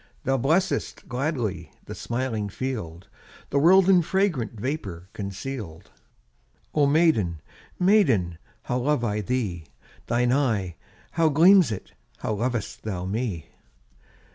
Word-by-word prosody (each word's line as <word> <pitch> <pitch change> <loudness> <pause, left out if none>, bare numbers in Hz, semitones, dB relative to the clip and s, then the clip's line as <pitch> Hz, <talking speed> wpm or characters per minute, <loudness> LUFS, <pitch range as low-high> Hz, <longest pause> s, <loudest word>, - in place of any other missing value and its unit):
Thou 135 -1 +1
blessest 160 +9 0
gladly 125 - -2 0.2
The - - -7
smiling 120 -4 -3
field, 100 -8 -5 0.4
The 140 - +2
world 185 +5 +6
in 185 -2 +6
fragrant 160 - -1
Vapour 100 - -4
conceal'd. 100 -3 -6 0.8
Oh 145 -2 +3
maiden, 140 - +2 0.4
maiden, 130 - +3 0.2
How 125 - -1
love 140 0 +1
I 105 -2 0
thee! 100 -8 -2 0.4
Thine 120 +1 +2
eye, 110 - 0 0.4
how 165 -1 +3
gleams 170 - +6
it! 105 - -6 0.3
How 110 - -2
lov'st 115 +1 -3
thou 95 -4 -4
me! 95 -6 -3
120 Hz, 115 wpm, -25 LUFS, 100-150 Hz, 0.8 s, world